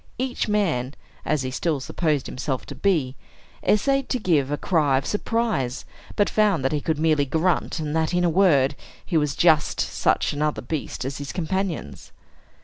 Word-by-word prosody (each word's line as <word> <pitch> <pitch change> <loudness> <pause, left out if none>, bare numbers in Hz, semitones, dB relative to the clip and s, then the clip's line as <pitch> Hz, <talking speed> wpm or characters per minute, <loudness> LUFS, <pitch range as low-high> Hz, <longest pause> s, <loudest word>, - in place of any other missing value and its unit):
Each 255 -1 -2
man 160 -11 0 0.3
(as 155 -3 0
he 130 - -3
still 150 +2 -1
supposed 150 +1 -1
himself 130 0 -3
to - - -8
be) 155 -10 0 0.5
essayed 275 +6 +2
to 255 - +1
give 160 - +1
a 145 - -1
cry 150 -7 +2
of 135 - -2
surprise, 210 - -1 0.3
but 205 - +3
found 210 -10 +2
that 135 - +2
he 150 -1 -1
could 160 0 -1
merely 155 -2 +2
grunt, 160 +6 0
and 155 -1 -3
that, 160 -1 +1
in 180 0 +1
a - - +4
word, 160 -7 +3 0.3
he 175 - -3
was 150 -3 +1
just 160 -3 +3
such - - +1
another 150 -1 -1
beast 140 -1 -4
as 135 +1 -4
his 140 -1 -5
companions. 175 - -3
155 Hz, 175 wpm, -24 LUFS, 140-190 Hz, 0.5 s, a